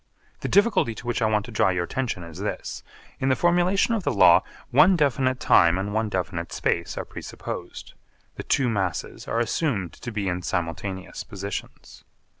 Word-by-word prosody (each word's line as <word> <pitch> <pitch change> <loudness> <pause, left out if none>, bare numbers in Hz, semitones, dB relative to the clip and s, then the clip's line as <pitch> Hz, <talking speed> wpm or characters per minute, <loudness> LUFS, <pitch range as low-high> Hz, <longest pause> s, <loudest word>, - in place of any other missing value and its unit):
The - - -3
difficulty 200 - +3
to - - -10
which 120 -1 -1
I 110 - +3
want 105 -1 +1
to - - -10
draw 105 - +3
your 90 -2 0
attention 115 -3 -3
is 85 -2 -10
this: - - -4 0.4
In 135 - +1
the 130 - +4
formulation 180 - +2
of 225 - 0
the 145 - +1
law 100 - +6 0.3
one 155 +9 +6
definite 130 -4 +1
time 85 -5 +5
and 100 +2 -3
one 110 0 0
definite 90 -5 -3
space 85 +5 -1
are - - -3
presupposed. - - -7 0.4
The - - -7
two 135 -3 +1
masses 95 -7 -2
are 115 - 0
assumed 120 - -1
to 120 - -7
be 105 -3 -2
in 90 0 -1
simultaneous 90 +2 -4
positions. 100 -1 -7
110 Hz, 180 wpm, -25 LUFS, 95-135 Hz, 0.4 s, law